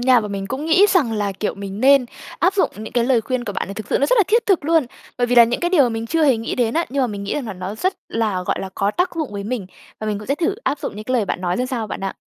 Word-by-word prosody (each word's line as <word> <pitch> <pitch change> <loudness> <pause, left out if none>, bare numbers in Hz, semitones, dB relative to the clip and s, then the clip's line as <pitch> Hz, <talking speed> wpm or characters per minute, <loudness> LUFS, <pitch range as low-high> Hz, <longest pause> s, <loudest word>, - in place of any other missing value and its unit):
nha. 245 -1 +5
Và 210 - -5
mình 195 -1 -4
cũng 270 +8 -4
nghĩ 355 +6 +5
rằng 335 - +2
là, 205 -2 -1
kiểu, 205 +2 -3
mình 200 +1 -7
nên 270 0 +5 0.3
áp 375 - +2
dụng 390 - +2
những 215 +1 -8
cái 240 -1 +2
lời 245 -2 +3
khuyên 255 +1 -3
của 205 - -4
bạn - - -3
này, 200 - -6
thực 215 0 -7
sự - - +2
nó 280 - +2
rất - - +3
là 415 - +5
thiết 460 +2 +2
thực 380 -7 +2
luôn. 320 -4 +3 0.3
Bởi 245 - +2
vì 245 - +1
là 235 - +9
những 235 +1 -2
cái 350 0 0
điều 325 -7 +5
mà 250 - +3
mình 225 0 -4
chưa 320 +5 +1
hề 265 -5 +4
nghĩ 225 - -3
đến 235 -2 0
á, 335 +1 +2
nhưng 275 +1 0
mà - - +2
mình 205 -3 -5
nghĩ - - -2
rằng 275 -5 -3
là 215 - -4
nó 185 +2 -6
rất 370 - -1
là, 215 -5 -1
gọi - - -1
là, 190 - -5
có 200 +1 +1
tác 360 - 0
dụng 315 -9 -3
với 200 0 -5
mình. 220 -3 -3 0.3
Và 215 - -4
mình 210 -1 -1
cũng 210 - -10
sẽ 280 - +1
thử 345 +5 0
áp 285 - 0
dụng 210 - -5
những 215 - -7
cái 255 - -3
lời 230 -4 +2
bạn 190 - -3
nói 180 -1 -1
ra 250 - -1
sao 245 -4 -3
bạn - - -6
ạ. 195 0 -3
240 Hz, 350 wpm, -20 LUFS, 210-290 Hz, 0.3 s, là